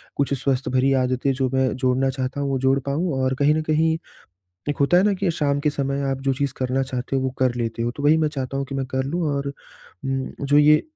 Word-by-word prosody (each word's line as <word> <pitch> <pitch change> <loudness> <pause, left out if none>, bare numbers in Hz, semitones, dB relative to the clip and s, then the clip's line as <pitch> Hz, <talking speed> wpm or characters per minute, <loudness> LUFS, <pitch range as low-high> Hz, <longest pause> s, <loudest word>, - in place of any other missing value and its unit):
कुछ 140 0 0
स्वस्थ 135 -2 0
भरी 130 +1 +2
आदतें 130 +2 0
जो 130 -1 0
मैं 130 0 +2
जोड़ना 130 +1 +1
चाहता 130 +1 -3
हूँ 140 - -1
वो 135 - 0
जोड़ 135 +1 +4
पाऊँ 155 +5 -1
और 130 0 +1
कहीं 145 +1 +4
न 155 - 0
कहीं 160 +1 +3 0.8
एक 145 - -1
होता 160 +6 +4
है 185 - +4
ना 210 - +3
कि 185 -4 +2
शाम 145 -3 0
के 150 +1 +1
समय 140 -1 -2
आप 135 0 -2
जो 135 0 +1
चीज़ 135 -1 -2
करना 130 +1 0
चाहते 130 0 -4
हो 135 - +1
वो 130 - 0
कर 130 -2 +2
लेते 115 -1 -3
हो। 120 +1 0
तो 145 - -6
वही 155 +2 +5
मैं 155 - +2
चाहता 135 -2 -4
हूँ 140 - -2
कि 135 - -4
मैं 135 -1 -1
कर 130 - +1
लूँ 165 +6 -2
और 140 0 -2
उम, 135 -1 -6
जो 140 +1 +3
ये 150 +1 +6
135 Hz, 255 wpm, -23 LUFS, 130-145 Hz, 0.8 s, ये